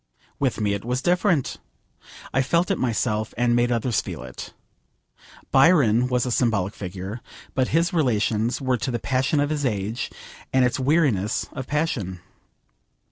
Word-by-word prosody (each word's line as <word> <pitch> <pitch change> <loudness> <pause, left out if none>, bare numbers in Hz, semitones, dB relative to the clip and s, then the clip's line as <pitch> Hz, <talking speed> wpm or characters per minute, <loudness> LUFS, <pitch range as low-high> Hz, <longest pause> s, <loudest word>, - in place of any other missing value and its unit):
With 135 -4 0
me 105 -1 +1
it 100 - -4
was 125 +3 -2
different. 180 -5 +1 0.8
I 135 - +3
felt 170 +8 +1
it 195 - 0
myself, 110 -3 -1
and 120 0 +2
made 120 0 +2
others 120 -1 +1
feel 65 - -7
it. 65 -1 -8 1.0
Byron 135 -5 +5
was 125 -1 +1
a 125 - -2
symbolic 110 -5 +1
figure, 95 +4 -6 0.3
but 130 -1 +1
his 170 +4 +1
relations 115 -6 +1
were 130 -2 0
to 120 - -3
the 120 - -1
passion 130 +6 0
of 145 +1 +1
his 150 -2 -1
age 110 -2 -2 0.4
and 130 -1 +4
its 125 - 0
weariness 130 - +1
of 130 -2 -6
passion. 125 - -2
125 Hz, 155 wpm, -24 LUFS, 110-140 Hz, 1.0 s, Byron